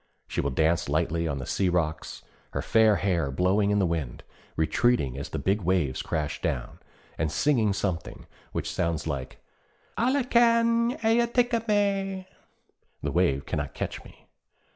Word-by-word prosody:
She - - -2
will 70 - -1
dance 80 +5 +1
lightly 85 +1 0
on 70 -3 -2
the 65 - -5
sea 95 +7 0
rocks, 80 -3 -2 0.3
her - - -2
fair 110 -2 +4
hair 85 -8 0
blowing 95 +8 +2
in 105 - +2
the 100 - +3
wind, 80 -8 -3 0.3
retreating 80 - +1
as 70 - -6
the - - -4
big 100 +2 0
waves 85 -7 0
crash 75 -2 -3
down, - - -3 0.4
and 80 -1 0
singing 110 - +2
something 95 -4 -3 0.3
which - - -3
sounds 85 -2 -1
like 65 -2 -5 0.6
'Ala 260 +4 +2
kan 235 +1 +3
eje 235 +1 +3
taka 240 -2 +2
mej!' 195 -2 0 0.8
(The - - -1
wave 85 -6 +1
cannot 75 -2 -3
catch - - -4
me!) - - -17
95 Hz, 155 wpm, -27 LUFS, -, 0.8 s, fair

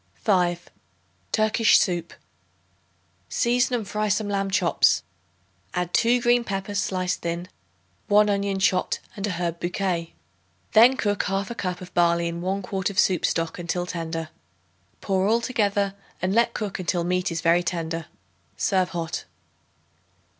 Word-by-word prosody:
5. 175 -4 +1 0.6
Turkish 215 0 +4
Soup. 175 -3 0 1.2
Season 245 +1 +1
and 220 -4 -3
fry 215 +3 -1
some 205 +1 0
lamb 195 -1 -1
chops; 185 -3 +3 0.7
add 180 -1 -2
2 240 +1 +3
green 240 0 +3
peppers 200 -1 -3
sliced 185 -1 -2
thin, 170 +1 -3 0.6
1 210 0 +5
onion 200 -1 0
chopped 190 -1 +1 0.2
and 200 0 -3
an 200 - -2
herb 170 -1 -3
bouquet. 175 -2 -2 0.6
Then 240 +4 +6
cook 205 -5 0
1/2 195 +4 -2
cup 180 -4 -3
of 180 0 -10
barley 170 -1 +3
in 170 0 -4
1 190 +2 -2
quart 190 +1 -2
of 200 - -8
soup 180 -4 +3
stock 165 +1 -2
until 175 +1 -2
tender. 165 -2 -4 0.7
Pour 190 -1 +1
all 225 +2 +3
together 205 -5 0 0.3
and 185 +1 0
let 235 +1 +2
cook 205 -3 -3
until 175 -1 0
meat 180 +1 0
is 165 -1 -3
very 170 +2 +4
tender. 165 -2 -3 0.5
Serve 185 -2 +1
hot. 170 -1 -4
190 Hz, 145 wpm, -24 LUFS, 175-205 Hz, 1.2 s, Then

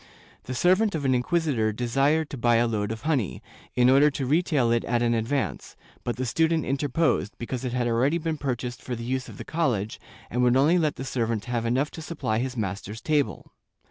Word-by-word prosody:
The 130 - -4
servant 185 - +3
of 145 -3 -3
an 130 - +3
inquisitor 125 -4 +1
desired 135 +7 +1
to 140 - -5
buy 120 0 +3
a 115 +1 +4
load 105 -2 -1
of 110 +3 -6
honey, 145 - -1 0.3
in 125 0 +4
order 140 +3 +6
to 135 -1 -3
retail 145 -4 +2
it 115 0 +2
at 120 0 +1
an 120 0 +2
advance, 115 +5 -2 0.3
but 120 - -2
the 130 - -2
student 160 +5 +1
interposed, 135 - 0
because 120 +1 -4
it 125 -2 -3
had 125 -1 0
already 120 +7 +2
been 160 -2 -3
purchased 125 -2 -3
for 125 - -4
the 115 - -6
use 130 +1 -2
of - - -11
the - - -7
college, 120 -11 -1 0.3
and 125 - 0
would 125 +1 +4
only 155 +6 +4
let 155 -3 +1
the 130 - -6
servant 115 -4 -1
have 120 -1 -1
enough 130 +5 +1
to 165 - -8
supply 150 -9 -2
his 130 0 -3
master's 105 +1 -4
table. 145 - -1
125 Hz, 210 wpm, -26 LUFS, 115-150 Hz, 0.3 s, order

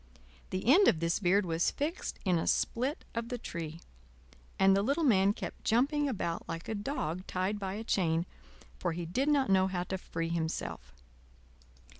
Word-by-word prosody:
The 185 0 -3
end 345 - +6
of 160 - +4
this 170 0 0
beard 195 +1 +3
was 165 0 +1
fixed 315 +6 -3
in 180 -3 +3
a - - -2
split 260 +6 0
of 230 0 -3
the 245 - -2
tree, 165 -6 -6 0.8
and 195 0 +5
the 195 - +3
little 280 +10 +1
man 200 -7 +5
kept - - -7
jumping 280 +6 +2
about 170 -8 -3
like 165 0 -5
a - - -2
dog 205 - -3
tied 190 +3 -1
by 190 -1 -3
a 220 - -5
chain, 170 -6 +1 0.5
for 175 -2 -1
he 175 +1 -4
did 255 - 0
not 275 -8 +3
know 190 0 +4
how 180 -2 -2
to 190 +1 -4
free 165 -2 -4
himself. 160 - -3
190 Hz, 180 wpm, -31 LUFS, 170-240 Hz, 0.8 s, end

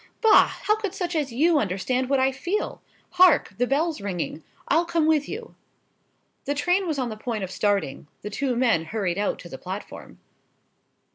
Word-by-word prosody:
Bah! 445 -2 +6 0.2
how 425 +1 +1
should 405 -3 -3
such 355 -3 -3
as 295 -5 -1
you 305 +6 +3
understand 250 +6 -1
what 275 -1 +3
I 265 +1 +3
feel? 345 +10 -3 0.3
Hark! 360 -4 +5
the 245 - +2
bell's 300 0 0
ringing—I'll 190 - -2
come 335 -2 +1
with 310 -2 +2
you." 455 +3 -7 0.9
The 285 - -1
train 355 +6 +1
was 310 -3 -1
on 255 -3 -1
the 215 - -5
point 215 -1 -4
of 185 - -5
starting: 200 -10 -1 0.2
the 210 - -5
two 260 +3 -1
men 230 -10 +2
hurried 195 0 -2
out 205 - 0
to 175 - -10
the - - -8
platform. 190 +3 -8
270 Hz, 180 wpm, -25 LUFS, 205-340 Hz, 0.9 s, Bah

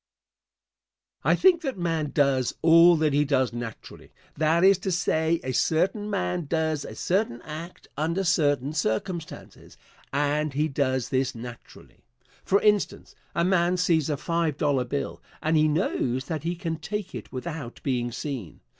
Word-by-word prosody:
I - - +4
think 365 -3 +4
that 270 - -3
man 165 -4 -1
does 135 -4 +1
all 165 +1 +7
that 155 -2 +1
he 145 +1 +3
does 130 -4 +1
naturally 120 -2 -8 0.2
that 160 +3 +2
is 195 -1 +6
to 190 - -2
say, 160 -1 +1
a 130 - -2
certain 185 - +1
man 180 -5 -2
does 160 -2 0
a - - -8
certain 185 - 0
act 160 +3 -8
under 165 +6 -1
certain 145 -5 +1
circumstances, 155 - -4 0.3
and 145 +1 0
he 150 +3 +1
does 130 -4 -1
this 130 -1 0
naturally. 115 0 -11 0.4
For 200 - +3
instance, 210 -1 +1 0.2
a 170 - +2
man 180 -1 +2
sees 165 -4 +2
a 145 - 0
five 165 -2 -1
dollar 140 -5 +1
bill, 140 +3 -4 0.2
and 155 +1 0
he 155 0 +4
knows 130 -5 0
that 160 -3 -3
he 170 +3 -2
can 165 -2 -3
take 195 +4 -5
it - - -8
without 140 -1 -6
being 120 -3 -1
seen. 125 - -6
155 Hz, 155 wpm, -26 LUFS, 140-175 Hz, 0.4 s, all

